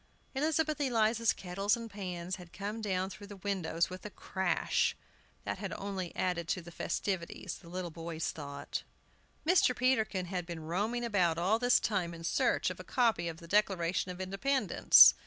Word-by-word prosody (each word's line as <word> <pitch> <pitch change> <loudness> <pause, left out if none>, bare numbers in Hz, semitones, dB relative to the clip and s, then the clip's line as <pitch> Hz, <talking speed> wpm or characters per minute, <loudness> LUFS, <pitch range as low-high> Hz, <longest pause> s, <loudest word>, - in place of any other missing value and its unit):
Elizabeth 305 +1 +1
Eliza's 230 -3 +3
kettles 195 +5 0
and 230 -1 -6
pans 180 -2 -4
had 175 -2 -12
come 205 +3 -4
down 190 -3 0
through 200 +1 -9
the 205 - -9
windows 185 -4 0
with 185 0 -7
a 210 - -5
crash, 190 -2 0 0.5
that - - -3
had - - -4
only 195 -3 -4
added 175 -2 -1
to 185 - 0
the 170 0 -10
festivities, 185 0 -3
the 170 - -14
little 180 -1 -4
boys 165 0 -3
thought. 145 -2 -5 0.6
Mr. 325 -7 +5
Peterkin 220 -7 +2
had 180 -1 -3
been 165 -3 -6
roaming 210 +9 -1
about 180 -7 +2
all 190 +6 +2
this 245 0 +5
time 180 -5 -1
in 165 - -10
search - - +2
of - - -8
a - - -6
copy 230 -9 +2
of 165 -1 -4
the 170 - -12
Declaration 185 -2 +2
of 180 - -8
Independence. 195 +9 +6
190 Hz, 175 wpm, -32 LUFS, 170-220 Hz, 0.6 s, Independence